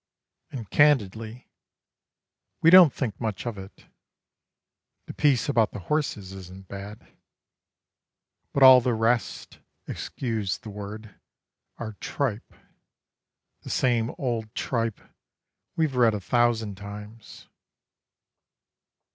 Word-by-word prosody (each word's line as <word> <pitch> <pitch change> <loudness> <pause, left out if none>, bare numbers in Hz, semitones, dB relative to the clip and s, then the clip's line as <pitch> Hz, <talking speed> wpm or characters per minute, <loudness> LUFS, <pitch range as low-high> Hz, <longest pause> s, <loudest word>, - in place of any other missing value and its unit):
And 120 -6 -7
candidly, 115 -4 +1 1.1
we 165 - +5
don't 180 -5 +9
think 120 -6 -4
much 110 -3 -3
of 120 -2 -3
it. 95 0 -13 1.2
The - - -9
piece 145 0 +2
about 115 -6 +2
the - - -6
horses 105 -11 -2
isn't 95 0 -11
bad; 100 +2 -10 1.4
But 140 - +2
all 130 -1 +10
the 120 -1 0
rest, 115 +1 -1 0.3
excuse 110 -6 -3
the 110 -4 -10
word, 105 +1 -9 0.6
are 110 -2 -6
tripe 120 -6 -3 1.1
The - - -10
same 120 -2 +1
old 115 -4 -3
tripe 115 -4 -2 0.7
we've 155 -5 0
read 115 -3 +4
a - - -3
thousand 115 -1 0
times. 105 +2 -11
115 Hz, 105 wpm, -25 LUFS, 105-125 Hz, 1.4 s, all